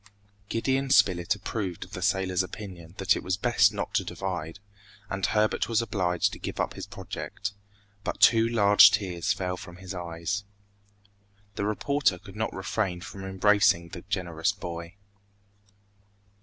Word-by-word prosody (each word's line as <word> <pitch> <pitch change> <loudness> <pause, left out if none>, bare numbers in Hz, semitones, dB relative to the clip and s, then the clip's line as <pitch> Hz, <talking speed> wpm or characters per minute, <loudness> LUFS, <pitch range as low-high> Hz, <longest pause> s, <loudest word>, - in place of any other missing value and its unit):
Gideon 135 +4 0
Spilett 90 -6 +4
approved 95 -3 -4
of - - -14
the - - -6
sailor's 95 -1 +1
opinion 90 -3 -8
that 95 - +3
it - - -3
was 95 +1 -1
best 105 -2 +4
not 105 - -4
to - - +2
divide, 90 -2 -4 0.5
and 95 -1 -3
Herbert 110 +3 +1
was 115 -2 +2
obliged 95 -6 0
to - - -8
give - - -5
up - - 0
his - - -7
project; - - -6 0.5
but - - -3
two 115 0 +6
large 105 -3 +7
tears 95 -5 -1
fell 90 -1 -2
from 90 -1 -10
his 95 +1 -8
eyes. 90 +3 -3 1.1
The 100 - -2
reporter 110 0 +1
could 95 +2 -13
not 110 +1 -1
refrain 95 -1 -2
from 95 +1 -8
embracing 95 -2 +3
the 85 - -8
generous 90 -2 -1
boy. 85 -2 -7
95 Hz, 150 wpm, -27 LUFS, 90-105 Hz, 1.1 s, large